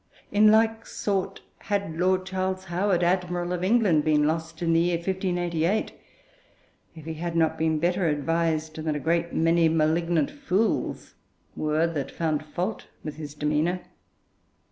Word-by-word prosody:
In 210 +1 +6
like 225 +1 +3
sort 195 -1 -2 0.2
had 200 -6 -2
Lord 185 +1 +2
Charles 190 0 -2
Howard, 180 0 0
Admiral 175 0 0
of 180 0 -3
England, 190 -7 +3
been 150 -1 +3
lost 160 +1 -2
in 165 -1 +2
the 165 - +4
year 175 +1 +2
1588, 175 +1 -1 1.0
if 160 -2 -11
he 160 - -4
had 170 +1 -4
not 160 -1 +2
been 160 0 +1
better 175 +3 +1
advised 160 +1 0
than 155 -1 -2
a - - -2
great 170 +3 0
many 165 0 +3
malignant 160 0 +1
fools 230 -7 -1 0.4
were 155 +2 +1
that 160 -5 -3
found 155 -2 -1
fault 180 +7 -4 0.2
with 150 -1 -6
his 150 -2 -7
demeanour. 150 +4 0
170 Hz, 145 wpm, -26 LUFS, 160-185 Hz, 1.0 s, In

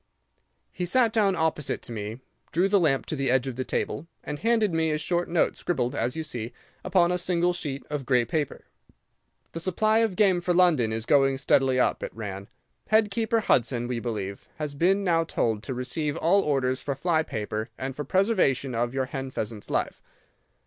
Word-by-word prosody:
He 180 - -5
sat 230 +4 +3
down 200 -4 +3
opposite 160 -3 -1
to - - -9
me, 110 +2 -5 0.3
drew 175 +5 +2
the 200 0 +3
lamp 145 -6 +2
to - - -3
the 135 -2 0
edge 130 0 +3
of 130 -3 -4
the 130 - -2
table, 145 +4 -3 0.2
and 145 0 -5
handed 225 -4 +2
me 160 0 +1
a 155 - 0
short 175 +2 -1
note 170 -1 +2
scribbled, 125 -8 -1
as 125 - -1
you 160 - -3
see, 120 -6 -5 0.3
upon 180 -2 +3
a 180 - 0
single 175 0 +1
sheet 145 -6 -5
of 150 -2 -3
grey 125 -3 +3
paper. 145 +3 -2 0.9
'The 165 - -5
supply 215 +6 +2
of 225 -5 +1
game 190 -3 +3
for 175 0 0
London 160 -11 +4
is 110 0 -3
going 135 0 +3
steadily 135 -1 +2
up,' - - +1
it - - -6
ran. 100 -3 -6 0.4
'Head 215 -1 +3
keeper 225 +1 +1
Hudson, 120 - +1
we 125 -1 -2
believe, 105 -5 -5
has 150 -2 -4
been 190 +7 +2
now 165 -3 +2
told 110 -9 -1
to 130 - -5
receive 145 +5 -2
all 185 +5 +3
orders 130 -4 0
for 140 - -3
fly 160 +3 +1
paper 110 -4 -4
and 130 0 -4
for 150 - -4
preservation 140 - +1
of 120 +2 -1
your 135 -1 0
hen 135 +1 -5
pheasant's 110 -4 -5
life. - - -1
150 Hz, 195 wpm, -26 LUFS, 125-180 Hz, 0.9 s, London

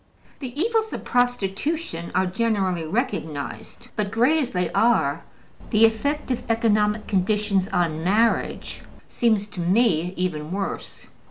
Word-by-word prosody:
The 260 0 -6
evils 440 +3 +1
of - - -5
prostitution 245 - -1
are 185 +1 +3
generally 190 -4 0
recognized, 205 - -4
but, 210 -2 -1
great 245 +9 +3
as 275 - -1
they 180 -2 -1
are, 170 -10 +2 0.5
the 220 0 +5
effect 285 +6 0
of 250 - -1
economic 215 -2 +2
conditions 200 0 +1
on 160 -2 0
marriage 215 +6 +1 0.3
seems 220 -4 +1
to 200 - -9
me 180 -2 +2
even 165 -4 -2
worse. 195 +1 -5
210 Hz, 125 wpm, -24 LUFS, 180-240 Hz, 0.5 s, the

